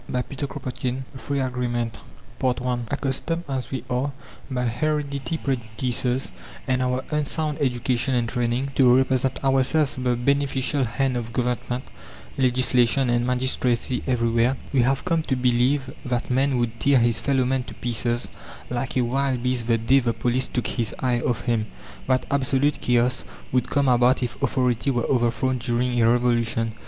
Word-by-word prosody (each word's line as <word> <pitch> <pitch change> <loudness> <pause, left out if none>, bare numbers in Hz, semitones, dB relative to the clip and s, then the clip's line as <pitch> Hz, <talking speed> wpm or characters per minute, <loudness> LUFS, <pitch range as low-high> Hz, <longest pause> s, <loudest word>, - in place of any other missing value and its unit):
CHAPTER 135 +3 -3 0.3
XI 125 0 -1 0.2
FREE 140 +1 -2
AGREEMENT 120 -2 -2 0.4
I 125 -1 0
Accustomed 140 +4 -2
as 130 -4 -3
we 130 -4 -4
are 125 +3 -1 0.4
by 125 -2 -1
heredity 140 +4 -1
prejudices 125 0 -2 0.4
and 130 0 +1
our 125 0 0
unsound 150 +1 -1
education 125 0 0
and 120 -1 +1
training 120 +3 -1
to 125 -2 +5
represent 130 0 +1
ourselves 135 +2 +2
the 125 -1 +1
beneficial 140 +1 +1
hand 130 +2 0
of 115 -1 -5
Government, 125 +1 -2 0.5
legislation 125 0 +2
and 120 0 +1
magistracy 125 -1 0
everywhere, 120 0 +2 0.2
we 135 - +4
have 130 +2 +1
come 165 -2 +2
to 140 -4 -1
believe 125 +2 +1
that 125 -1 -2
man 135 +1 +2
would 120 -1 -2
tear 140 -1 +4
his 120 -2 +2
fellow 135 -2 +1
man 130 +1 +1
to - - -10
pieces 120 0 -1 0.4
like 125 +1 -2
a - - +4
wild 130 0 0
beast 125 -2 0
the 115 -1 +3
day 120 +5 +4
the 120 -3 0
police 125 +3 0
took 120 -4 -2
his 115 -4 -2
eye 125 -2 +1
off 120 -2 -1
him; 115 -3 0 0.4
that 130 0 +2
absolute 140 +1 +1
chaos 125 +1 +2 0.3
would 125 -1 +1
come 140 -1 +2
about 125 +1 +4
if 120 - -4
authority 125 0 +1
were 120 -3 0
overthrown 125 +1 +1
during 120 0 0
a 115 - +5
revolution. 120 -2 +1
125 Hz, 155 wpm, -24 LUFS, 120-135 Hz, 0.5 s, to